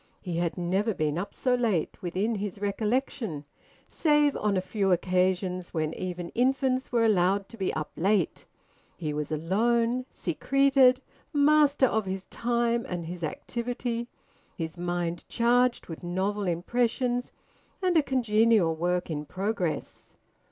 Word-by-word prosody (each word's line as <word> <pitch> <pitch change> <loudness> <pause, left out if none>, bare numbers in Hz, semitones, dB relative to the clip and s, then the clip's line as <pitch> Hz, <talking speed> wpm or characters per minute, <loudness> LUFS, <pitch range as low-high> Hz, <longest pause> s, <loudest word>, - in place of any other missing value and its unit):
He 175 -2 -4
had 170 +1 -1
never 190 +5 0
been 155 +1 0
up 195 - -4
so 255 - 0
late, 225 -10 0
within 190 +6 -1
his 205 -2 -4
recollection, 210 - -2 0.4
save 295 -2 +2
on 210 -2 0
a - - +3
few 195 +1 -1
occasions 180 0 0
when 155 0 -1
even 180 -1 -5
infants 260 +1 +1
were 235 -2 +3
allowed 195 -1 +2
to 230 - -12
be 190 -3 -1
up 155 -1 -3
late. 195 0 0 0.5
He 155 -3 -3
was 150 0 -3
alone, 230 - +1
secreted, 265 - +3 0.3
master 290 -1 +4
of 220 -5 0
his 190 0 -4
time 235 0 0
and 175 -2 -3
his 175 +1 -7
activity, 235 +7 -3 0.5
his 160 -2 -4
mind 175 -1 -2
charged 245 +1 +2
with 165 - -8
novel 190 +3 -1
impressions, 240 +7 0 0.5
and 365 -3 +1
a 320 - +6
congenial 225 - +3
work 175 +1 -1
in 150 -1 -3
progress. 190 -2 -3
205 Hz, 135 wpm, -28 LUFS, 175-245 Hz, 0.5 s, a